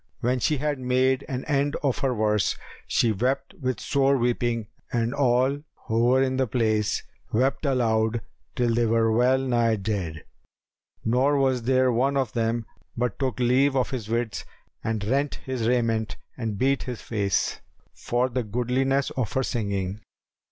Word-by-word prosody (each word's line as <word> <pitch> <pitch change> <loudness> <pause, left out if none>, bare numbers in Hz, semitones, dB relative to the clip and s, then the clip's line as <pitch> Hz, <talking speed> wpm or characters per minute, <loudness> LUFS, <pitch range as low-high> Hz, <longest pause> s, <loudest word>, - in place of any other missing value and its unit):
When 125 +2 +1
she 150 +5 +1
had 145 0 -1
made 130 +1 +2
an 130 -1 -3
end 145 -1 +1
of 140 -1 +1
her 135 -3 +1
verse, 105 -3 +1 0.3
she 115 - +2
wept 130 - -1
with 130 -4 -1
sore 140 0 +2
weeping 120 -2 0 0.3
and 120 +1 0
all 130 0 +2 0.3
who 115 +1 +1
were 130 +2 +4
in 130 -1 0
the 130 -1 +1
place 110 -3 0 0.3
wept 130 +6 +1
aloud 115 -3 +1 0.3
till 120 -2 +1
they 115 0 +2
were 115 0 +3
well 125 +4 +4
nigh 120 -4 +2
dead; 95 -7 -3 0.8
nor 130 +5 +3
was 130 -2 +2
there 130 +1 +3
one 135 +4 +1
of 130 -4 -1
them 115 -1 0 0.3
but 120 -2 -1
took 130 -4 -1
leave 130 +3 +3
of 130 0 +1
his 115 -5 -4
wits 115 -1 -1 0.4
and 110 -2 -1
rent 140 +5 0
his 130 -4 -2
raiment 115 -3 +1 0.2
and 110 -5 -3
beat 135 +4 +2
his 125 -3 -5
face, 100 -4 0 0.3
for 120 +1 0
the 130 0 -2
goodliness 130 +5 0
of 130 -8 -2
her 130 - +1
singing. 100 -5 -2
125 Hz, 160 wpm, -25 LUFS, 115-130 Hz, 0.8 s, were